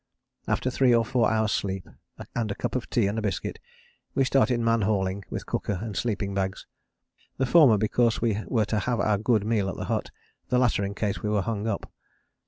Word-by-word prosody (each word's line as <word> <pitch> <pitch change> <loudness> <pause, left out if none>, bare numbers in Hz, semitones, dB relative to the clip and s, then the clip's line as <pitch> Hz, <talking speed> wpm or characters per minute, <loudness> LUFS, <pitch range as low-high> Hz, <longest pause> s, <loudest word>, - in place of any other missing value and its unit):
After 130 - 0
three 125 -1 +4
or 115 -1 +3
four 120 -2 +2
hours' 110 -1 +1
sleep, 95 -2 -2 0.5
and 115 -2 -1
a 100 - -3
cup - - -3
of 130 - -3
tea 115 - +2
and 100 +3 -1
a - - -3
biscuit, 100 -4 -3 0.6
we 135 - +3
started 130 -2 +2
man 115 -1 +2
hauling 95 -1 0
with - - -5
cooker 100 - -2
and 105 0 -5
sleeping 100 -3 -1
bags: 95 -1 -2 0.7
the 130 - +1
former 130 -5 +6
because 110 +2 +2
we 110 -3 0
were 110 -4 +1
to 110 0 0
have 120 +3 -1
our 105 -2 +2
good 110 -1 +2
meal 105 -3 +1
at 85 - -4
the - - -5
hut, - - -2 0.4
the 125 - +2
latter 120 -5 +2
in 100 0 -3
case 105 -3 -2
we 105 - -2
were 105 -2 +1
hung 110 0 -2
up. 105 -3 -4
110 Hz, 210 wpm, -26 LUFS, 100-120 Hz, 0.7 s, former